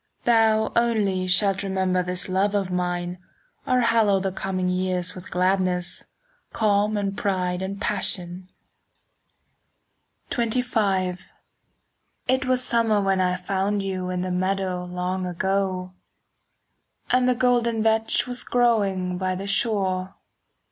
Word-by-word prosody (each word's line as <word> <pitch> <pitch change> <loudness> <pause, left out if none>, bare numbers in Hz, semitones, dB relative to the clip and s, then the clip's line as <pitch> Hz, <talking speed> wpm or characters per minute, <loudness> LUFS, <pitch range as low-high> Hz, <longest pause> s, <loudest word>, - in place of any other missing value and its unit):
Thou 220 -2 +3
only 205 -6 +1
shalt 195 +1 +3
remember 190 -2 0
This 180 0 -1
love 195 +2 +1
of 195 -2 -1
mine, 180 0 -2 0.5
or 255 0 +3
hallow 225 -4 +3
10 - - -5
The 195 - -1
coming 185 -1 -2
years 180 -1 -1
with 180 - -10
gladness, 180 -1 0 0.5
Calm 210 0 +2
and 200 -1 -2
pride 185 -3 -1
and 195 +1 -4
passion. 185 -3 -3 1.8
XXV 220 -6 +1 1.1
It 260 +2 +2
was 255 0 +2
summer 230 -3 +2
when 195 -1 +1
I 180 0 +1
found 195 +2 -1
you 185 -1 -3
In 180 0 -2
the 185 - -3
meadow 185 0 -1
long 180 +1 -3
ago,— 185 0 -1 1.2
And 255 0 +3
the 250 - +2
golden 235 -2 +2
vetch 220 0 +2
was 250 0 -5
growing 200 -7 +1
By 185 -1 -1
the 195 +2 -5
shore. 195 -3 0
195 Hz, 125 wpm, -24 LUFS, 185-220 Hz, 1.8 s, Thou